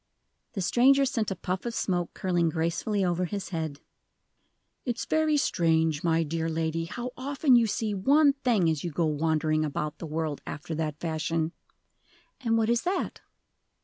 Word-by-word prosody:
The 195 - -3
stranger 270 +8 +4
sent 240 -5 -1
a 195 - -2
puff 185 0 -3
of 235 -1 -4
smoke 175 -3 -1
curling 175 -3 +1
gracefully 170 +5 0
over 175 0 0
his 195 0 -4
head. 160 -5 -4 1.0
"It's 245 -2 -3
very 315 -1 +2
strange, 160 - +1
my 165 -1 +2
dear 165 +1 -2
lady, 160 0 -1
how 245 +8 -5
often 275 0 +2
you 235 -2 +5
see 215 0 -1
one 280 +9 +4
thing 240 - +1
as 160 -3 0
you 175 - -2
go 165 +2 0
wandering 155 0 +1
about 150 +1 -3
the 165 - -6
world 155 -1 -3
after 155 +3 -5
that 155 -1 -3
fashion." 160 0 -1 0.9
"And 230 -4 +1
what 220 -1 +2
is 235 0 +2
that?" 370 +2 -2
175 Hz, 165 wpm, -28 LUFS, 160-235 Hz, 1.0 s, you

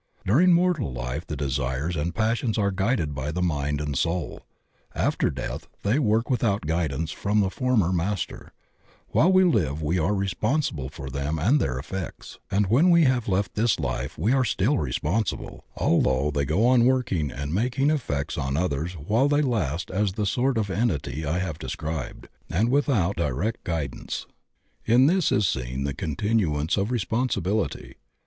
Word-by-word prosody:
During 160 - +5
mortal 170 - +2
life 60 0 -4
the 75 - -4
desires 70 +3 -2
and 80 +2 -2
passions 115 +1 0
are 100 -2 +2
guided 95 - 0
by 70 +2 -3
the 90 +3 -2
mind 75 -4 -1
and 75 -2 -3
soul; 85 +1 -2 0.5
after - - +1
death 65 -2 -5 0.2
they 110 +8 +2
work 115 -3 +2
without 110 - 0
guidance 80 -1 -1
from 105 +1 0
the 95 -2 +1
former 115 -9 +1
master; 90 0 -3 0.6
while 180 - +4
we 185 0 +6
live 80 - +1
we 85 +5 +1
are 95 +6 +1
responsible 95 - -1
for 70 -1 -8
them 70 +4 -2
and 115 - +3
their 65 -1 -1
effects, 85 +7 -7
and 100 +1 +2
when 130 - +4
we 170 -1 +6
have 130 -4 +2
left 95 -1 0
this 115 +1 +1
life - - -3
we 105 - +1
are 135 -1 +3
still 120 +4 +1
responsible, 80 - -2
although 65 +3 +2
they 70 0 0
go 85 - +2
on 125 -1 +5
working 120 - +1
and 70 +3 -5
making 125 - +1
effects 75 - -2
on 70 0 -1
others 80 0 -1
while 105 - +1
they 145 +1 +2
last 90 - -1
as 100 0 0
the 105 +1 -2
sort 125 +5 +1
of 105 -3 -1
entity 80 - -1
I 80 +4 0
have 90 -5 -3
de - - -6
scribed, 80 -3 -5 0.2
and 110 +8 +1
without 120 - +1
our 75 - +1
direct 105 - -2
guidance. 80 -6 -4 0.6
In 120 +4 +5
this 180 +2 +3
is 100 -2 +3
seen 65 -1 -2
the 70 0 -2
continuance 80 -1 0
of 100 +1 0
responsibility. 110 -3 -1
95 Hz, 170 wpm, -25 LUFS, 75-115 Hz, 0.6 s, we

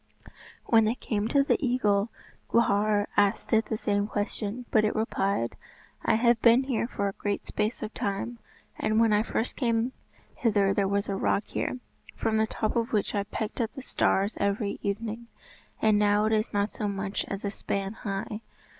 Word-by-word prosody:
When 225 -1 +5
they 220 +3 +1
came 215 -4 -2
to 275 +3 +3
the 280 - +1
eagle, 215 -5 +2 0.4
Gwrhyr 210 -2 +3
asked 205 +3 +2
it 220 0 +4
the 220 - -2
same 205 -1 0
question; 210 +3 -3
but 215 - +4
it 215 - +1
replied, 200 - 0 0.5
"I - - +3
have 235 0 +3
been 235 +3 +6
here 255 -3 -1
for 200 -4 -2
a 195 - -3
great 205 0 -3
space 215 +2 -2
of 215 - -5
time, 205 +4 -3 0.4
and 215 +1 +2
when 225 -2 +4
I 210 - +4
first 225 +1 -2
came 235 -1 +1 0.4
hither 205 -4 +2
there 195 -1 +1
was 200 +1 0
a 200 - -1
rock 200 +1 +1
here, - - -3 0.4
from 220 -1 0
the 220 0 +2
top 215 -1 -2
of 230 0 0
which 210 - +1
I 200 -1 0
pecked 220 +3 -4
at 225 - -2
the 270 - -7
stars 200 -4 +1
every 200 +1 0
evening, 220 +3 -3 0.6
and 215 -1 +5
now 210 0 +3
it 220 - +2
is 215 +1 +1
not 205 +1 0
so 210 - -3
much 200 0 -2
as 200 +1 -4
a 200 - -1
span 195 0 -3
high. 210 0 -4
215 Hz, 190 wpm, -28 LUFS, 200-230 Hz, 0.6 s, been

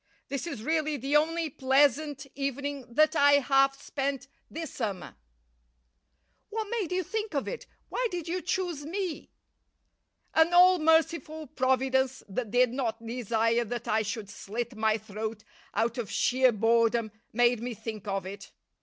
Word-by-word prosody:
This 280 +4 -3
is 220 -10 -5
really 310 0 0
the 275 +3 -1
only 325 +2 +2
pleasant 280 +1 +2
evening 275 -1 -4
that 310 +6 +3
I 285 -1 +6
have 275 -1 +4
spent 275 -1 -3 0.2
this 325 0 -6
summer." 205 -7 -4 1.3
"What 435 0 -3
made 430 -8 -2
you 370 0 0
think 430 -1 -4
of 280 - -1
it? - - -6 0.2
Why - - 0
did 350 -4 -5
you 360 +2 -2
choose 355 -5 -2
me?" 355 +1 -4 1.0
"An 320 +2 +4
all 365 0 +7
merciful 320 0 +2
Providence 265 0 +1
that 215 +3 -3
did 245 +2 +3
not 230 -3 -3
desire 230 0 +1
that 235 +1 -5
I 220 +1 +2
should 215 -1 -4
slit 230 +3 -5
my 220 0 +2
throat 215 +1 -6 0.3
out 235 +2 0
of 220 -4 -4
sheer 255 +4 +3
boredom 230 0 +2 0.2
made 240 0 +3
me 240 0 -4
think 220 -1 -7
of 195 -1 -2
it. 195 +1 -9
265 Hz, 150 wpm, -28 LUFS, 230-310 Hz, 1.3 s, all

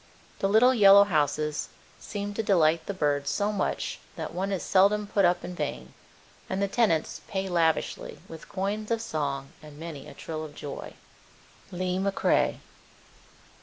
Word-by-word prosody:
The 195 - +1
little 235 +5 +6
yellow 200 -3 +8
houses 150 -4 0 0.3
seem 205 -1 -5
to 225 - -1
delight 165 -6 +3
the - - -1
birds 145 -4 0
so 205 +5 0
much 205 - -2 0.2
that - - -5
one 190 +2 -2
is 190 - -2
seldom 200 +2 +3
put 200 -1 +2
up 175 0 +2
in 180 - -6
vain, 140 - -5 0.6
and 190 - -2
the 200 - +1
tenants 195 -7 +1
pay 195 -1 -2
lavishly 165 -3 0
with 160 -1 -11
coins 205 +3 -3
of 230 -1 +1
song 140 -9 -3
and 150 -1 -13
many 160 -3 -8
a - - -11
trill 155 -1 -5
of 150 -2 -9
joy. 145 -1 -7 0.8
Lee 185 +1 -1
McCrae. 195 0 +1
185 Hz, 160 wpm, -27 LUFS, 155-200 Hz, 0.8 s, yellow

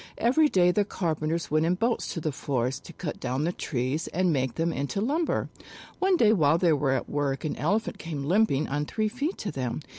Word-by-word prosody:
Every 295 +6 +3
day 180 -5 +4
the 205 +3 +2
carpenters 165 -4 -2
went 155 +1 +3
in 170 +2 +2
boats 230 +5 -1
to - - -2
the 155 -1 -2
forest 130 -2 -2
to 170 - -10
cut 155 -1 -5
down 130 +4 -2
the 170 - +1
trees 135 -1 -2
and 180 -1 +1
make 130 -3 -1
them 165 0 0
into 140 +7 -2
lumber. 295 +10 0 0.5
One 380 -1 +3
day 220 -7 +5
while 160 -5 +4
they 170 -2 +3
were 140 -2 +1
at - - -2
work 145 0 -1
an 155 - -2
Elephant 205 +10 -1
came 150 -4 -5
limping 175 -4 +2
on 145 +2 -2
three 215 -1 -1
feet 280 - -3
to 205 - -4
them. 130 -3 -3
165 Hz, 215 wpm, -27 LUFS, 145-210 Hz, 0.5 s, day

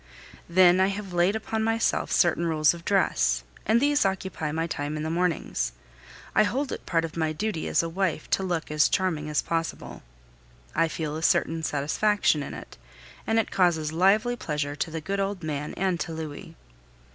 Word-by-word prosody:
Then 180 +1 +6
I 190 - +4
have 200 -1 -5
laid 175 +4 +3
upon 220 0 -2
myself 225 +1 0
certain 170 0 +3
rules 155 -1 +3
of 170 -1 -10
dress, 175 - +2 0.2
and 220 +3 +4
these 290 +2 +3
occupy 190 -5 -2
my 160 +2 -1
time 150 -2 -3
in 150 - -3
the 160 - -2
mornings. 165 - -1 0.6
I - - +5
hold 260 +6 0
it - - -6
part 165 -2 +1
of 160 - -8
my 160 -2 0
duty 205 -1 -3
as - - +2
a - - -2
wife 165 -2 -2
to - - +2
look 175 -5 -2
as 150 0 +3
charming 160 -5 0
as 150 - 0
possible. 165 0 -3 0.7
I 165 - +2
feel 155 -2 -4
a 160 - -4
certain 165 0 +2
satisfaction 155 +4 +1
in 140 - -6
it, - - -11 0.5
and 225 - +2
it 225 - +1
causes 160 -5 +2
lively 210 +8 +3
pleasure 150 -8 -3
to 155 - -2
the 160 0 -5
good 195 +5 -3
old 195 -2 -2
man 150 -1 -4
and 185 -2 0
to 165 - -3
Louis. 155 -2 -7
170 Hz, 190 wpm, -26 LUFS, 155-195 Hz, 0.7 s, Then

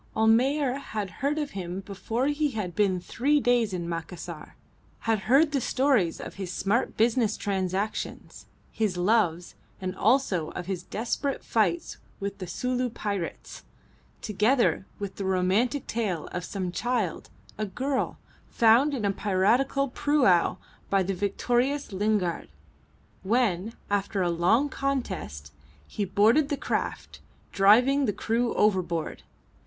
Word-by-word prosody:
Almayer 255 +5 +3
had 210 -8 -5
heard 285 +2 +1
of 295 -2 -2
him 185 0 -5
before 205 +6 -3
he 295 +1 +1
had 210 -8 -4
been 195 -3 +2
three 280 +11 +1
days 245 -5 +2
in 175 -2 -3
Macassar, 170 -1 -6 0.5
had 225 -2 +1
heard 290 +4 +5
the 275 -3 0
stories 255 -11 +2
of - - -7
his 180 -2 -4
smart 205 +7 0
business 225 -1 +2
transactions, 195 +1 -3 0.2
his 210 -5 -1
loves, 180 -3 +1 0.3
and 185 0 -4
also 205 - +2
of 180 - -5
his 185 -1 -3
desperate 245 +5 -3
fights 195 -7 0 0.2
with 200 0 -4
the 185 - -5
Sulu 250 +7 -1
pirates, 200 -6 -5 0.6
together 215 0 +2
with 200 -2 -6
the 200 - -3
romantic 190 +8 +1
tale 205 -8 -2
of 180 - -4
some 185 0 -4
child 235 -3 -2 0.3
a 215 - -1
girl 260 +7 -2 0.3
found 240 +6 +4
in 225 -6 -2
a 200 - +2
piratical 225 +9 +1
prau 255 - +2 0.3
by 195 -1 +3
the 195 +2 -2
victorious 240 +7 0
Lingard, 200 -3 0 0.7
when, 215 -1 +1 0.2
after 200 -1 0
a 175 - +1
long 185 +12 +3
contest, 190 - -3 0.3
he 205 - -3
boarded 225 +10 +3
the 285 - -1
craft, - - -3 0.3
driving 245 +8 +5
the 210 - +1
crew 230 +4 -1
overboard. 175 -6 0
210 Hz, 135 wpm, -27 LUFS, 185-250 Hz, 0.7 s, heard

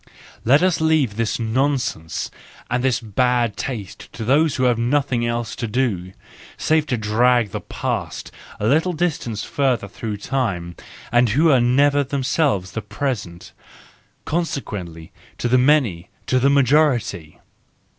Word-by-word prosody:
Let 140 +8 +4
us 185 -3 +2
leave 155 -9 +2
this 115 -1 -1
nonsense 115 - -1 0.4
and 125 +1 0
this 130 -2 +2
bad 120 0 0
taste 110 -8 -6
to 110 - -6
those 145 +4 +3
who 130 - -1
have 120 -2 +2
nothing 125 -1 +1
else 120 -1 -3
to 115 - -3
do, 105 -7 -1 0.4
save 155 -1 +1
to 125 - 0
drag 115 +1 +2
the - - -4
past - - -4 0.3
a 105 - -2
little 160 +9 +2
distance 150 - -2
further 130 -7 0
through 105 +1 -5
time, 100 -8 -2 0.4
and 120 0 +4
who 155 +9 +4
are 130 -3 +4
never 140 +4 +3
themselves 135 - 0
the 115 - -4
present,—consequently 105 - -6 0.3
to - - -1
the 125 +1 +4
many, 125 - +2 0.2
to 130 - +2
the 135 +2 +3
majority! 130 - +2
125 Hz, 135 wpm, -21 LUFS, 105-140 Hz, 0.4 s, Let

